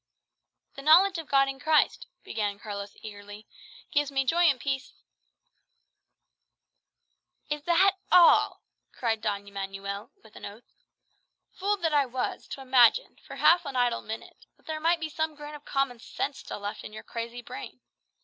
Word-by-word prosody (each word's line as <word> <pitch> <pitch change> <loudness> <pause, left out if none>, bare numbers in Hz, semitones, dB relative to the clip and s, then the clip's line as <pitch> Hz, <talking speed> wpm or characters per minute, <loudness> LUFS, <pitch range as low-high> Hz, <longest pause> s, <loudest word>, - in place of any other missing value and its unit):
"The 275 - -9
knowledge 345 +5 +5
of 320 - -8
God 275 -1 +4
in 270 0 -5
Christ," 310 +3 +2 0.2
began 205 -2 -3
Carlos 200 -2 -7
eagerly, 205 0 -10 0.5
"gives 290 -1 +1
me 270 -1 0
joy 340 +6 +3
and 280 -6 +4
peace 275 0 -3 1.7
" - - -34
"Is 295 0 -1
that 380 +3 +4
all?" 350 -2 +6 0.3
cried 225 -3 -2
Don 200 -2 -2
Manuel 200 +1 -5
with 220 -1 -19
an - - -12
oath. 210 +4 -11 0.8
"Fool 410 +2 -1
that 330 -5 -1
I 285 -2 +3
was, 250 +1 -4
to 275 - -7
imagine, 260 - +4
for - - -8
half 345 +1 +5
an 280 -4 -6
idle 245 -1 +1
minute, 220 +1 -9
that - - -30
there 315 -1 -4
might 335 +2 +2
be 320 - -3
some 315 0 -3
grain 295 0 -9
of 295 -1 -11
common 275 -3 -1
sense 275 +4 -4
still - - -8
left 205 +1 -5
in 210 - -9
your 215 - -9
crazy 235 +1 -6
brain! 410 - -9
270 Hz, 165 wpm, -28 LUFS, 220-315 Hz, 1.7 s, all